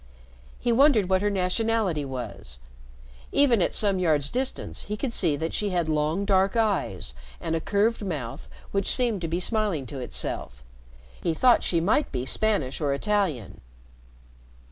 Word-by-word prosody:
He 240 - 0
wondered 235 -6 +4
what 190 0 +3
her 205 - +2
nationality 195 -3 0
was. 120 - -6 0.7
Even 250 -7 +4
at - - +1
some 200 -3 +2
yards' 150 -5 +2
distance 255 +1 -3
he 210 +1 -4
could 250 +1 -3
see 165 -9 +2
that 160 +3 -3
she 210 - -1
had 175 -3 0
long 155 +5 0
dark 195 0 +2
eyes 190 - 0 0.3
and 165 - -2
a 165 - -1
curved 215 +4 +1
mouth 125 - -5 0.2
which 195 0 0
seemed 235 -7 0
to 165 - -2
be 170 +2 -1
smiling 200 - -1
to 135 +3 -7
itself. 60 - -5 0.6
He 165 - 0
thought 250 +7 +5
she 170 - +2
might 210 - +1
be 125 - -3
Spanish 160 -5 +1
or 140 -2 +1
Italian. 180 - -1
185 Hz, 160 wpm, -26 LUFS, 150-215 Hz, 0.7 s, thought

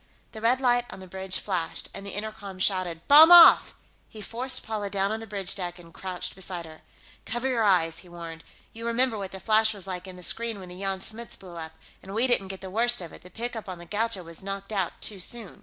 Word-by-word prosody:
The 220 - -9
red 240 +3 +3
light 245 -2 +2
on - - -9
the 190 - -10
bridge 190 0 -4
flashed, 180 -5 -2
and 195 - -7
the 200 -1 -6
intercom 205 -2 -6
shouted, 185 -3 -1
"Bomb 310 +4 +9
off!" 345 -1 +9 0.3
He 220 - -11
forced 250 +5 -1
Paula 215 -2 -3
down 195 0 0
on 220 - -2
the 225 - -9
bridge 195 -3 -2
deck 175 -2 -4
and 170 -2 -15
crouched 185 -2 -5
beside 180 -2 -6
her. 155 -1 -13 0.4
"Cover 240 +4 -2
your 245 -4 +1
eyes," 170 -5 +3
he 180 - -12
warned. 165 -1 -9 0.3
"You 230 +1 -6
remember 235 0 +2
what 195 -3 -5
the 190 - -7
flash 220 +2 +3
was 195 -2 -7
like 185 -1 -5
in 185 - -9
the 180 - -11
screen 230 +2 0
when 185 -1 -10
the 180 +1 -10
Jan 195 -1 -3
Smuts 230 +3 -3
blew 180 -3 -12
up. 160 -1 -7 0.3
And 195 +2 -9
we 230 +3 +4
didn't 240 -6 +4
get 190 0 -7
the 190 -1 -8
worst 240 +4 +3
of 175 -3 -8
it; - - -11
the 180 - -13
pickup 225 +1 -5
on 185 - -6
the 175 - -11
Gaucho 210 +1 -2
was 165 -1 -8
knocked 195 +1 -6
out 195 -4 0
too 205 -3 -1
soon." 220 +1 -4
195 Hz, 245 wpm, -27 LUFS, 180-225 Hz, 0.4 s, Bomb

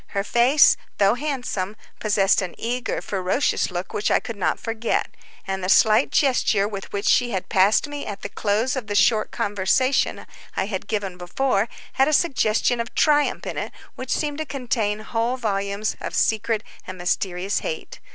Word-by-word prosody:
Her 200 - +2
face, 245 +7 +5 0.2
though 200 0 +4
handsome, 245 -8 -3 0.2
possessed 205 -2 +3
an 180 -2 -5
eager, 245 +2 -2
ferocious 190 +7 0
look 180 0 -5
which 210 - 0
I - - +4
could 230 - -7
not 195 - -1
forget, 225 0 -2 0.3
and 190 -1 -3
the 185 - -1
slight 215 - +5
gesture 240 -7 +2
with 200 -2 -7
which 200 +1 -3
she 245 -1 +4
had 190 -5 -3
passed 195 +8 +3
me 290 0 -6
at 200 -1 -7
the - - -4
close 220 +6 0
of 255 -5 -4
the 205 - -3
short 215 +2 +3
conversation 205 +7 0 0.3
I - - +1
have 195 -2 -5
given 195 -4 -3
above 215 +3 0 0.3
had 270 - +3
a 305 - +1
suggestion 245 -6 +2
of 235 +1 -4
triumph 295 -1 +2
in - - -3
it - - -5 0.2
which 255 0 -8
seemed 295 -1 -1
to 315 - -2
contain 230 -6 -1
whole 230 +3 -1
volumes 200 -2 -2
of - - -5
secret 220 0 +1 0.2
and 185 - -7
mysterious 180 +2 -1
hate. - - -6
215 Hz, 175 wpm, -23 LUFS, 195-250 Hz, 0.3 s, face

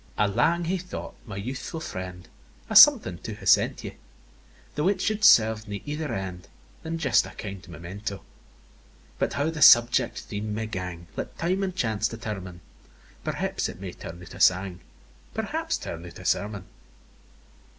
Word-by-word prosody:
I 105 - +3
lang 120 - +2
hae 185 +3 0
thought, 180 +1 -7
my 100 -3 -6
youthfu' 130 - -5
friend, 90 - -7 0.4
A - - -2
something 90 -1 +8
to 110 - -6
have 100 -2 -9
sent - - +4
you, - - -5 0.8
Though 150 +4 0
it 200 - +2
should 215 0 -1
serve 110 - +6
nae 100 -1 -6
ither 150 +1 -3
end 90 -2 -5 0.3
Than 165 +1 -4
just 140 -6 +3
a - - -9
kind 100 -3 -7
memento; 95 +5 -7 0.9
But - - 0
how 145 +3 0
the 160 -1 -6
subject 120 -3 +6
theme 105 0 -5
may 110 +1 -2
gang, 90 -5 -5
Let - - -6
time 185 +3 0
and 190 -2 -2
chance 110 - 0
determine; 95 -6 -6 0.6
Perhaps - - -2
it - - -9
may - - -6
turn 85 - -9
out 85 - -12
a - - -10
sang, 95 -1 +3 0.6
Perhaps, - - -2
turn 85 0 -7
out 90 -1 -10
a - - -11
sermon. 100 -2 -1
105 Hz, 165 wpm, -26 LUFS, 95-150 Hz, 0.9 s, something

